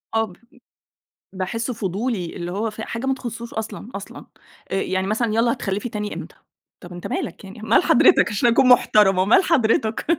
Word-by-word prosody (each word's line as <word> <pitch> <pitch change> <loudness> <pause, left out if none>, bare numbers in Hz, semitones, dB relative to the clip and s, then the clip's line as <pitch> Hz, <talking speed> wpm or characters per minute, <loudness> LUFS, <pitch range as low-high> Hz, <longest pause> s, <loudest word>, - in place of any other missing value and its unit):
آه 225 - +3
بب 185 -5 -14 1.0
باحسُّه 225 +6 -3
فضولي، 200 -2 -3
اللي 175 0 -5
هو 215 +4 -2
في 220 +1 -8
حاجة 230 +3 -5
ما 270 - +2
تخصّوش 235 -2 -7
أصلًا، 220 +1 -6
أصلًا. 200 - -8 0.5
آآ - - 0
يعني 190 0 -1
مثلًا 220 +1 0
يالّا 230 +1 +2
هتخلّفي 205 -1 -3
تاني 210 -1 -4
أمتى؟ - - -8 0.5
طَب 175 0 -10
أنت 175 - -7
مالك 180 - -4
يعني، 195 +2 -11
مال 220 - +3
حضرتَك - - +5
علشان 210 +4 +2
أكون 245 +2 +4
محترمة، 195 -6 +5
مال 225 - +5
حضرتَك. 225 -8 +1
215 Hz, 175 wpm, -22 LUFS, 195-235 Hz, 1.0 s, حضرتَك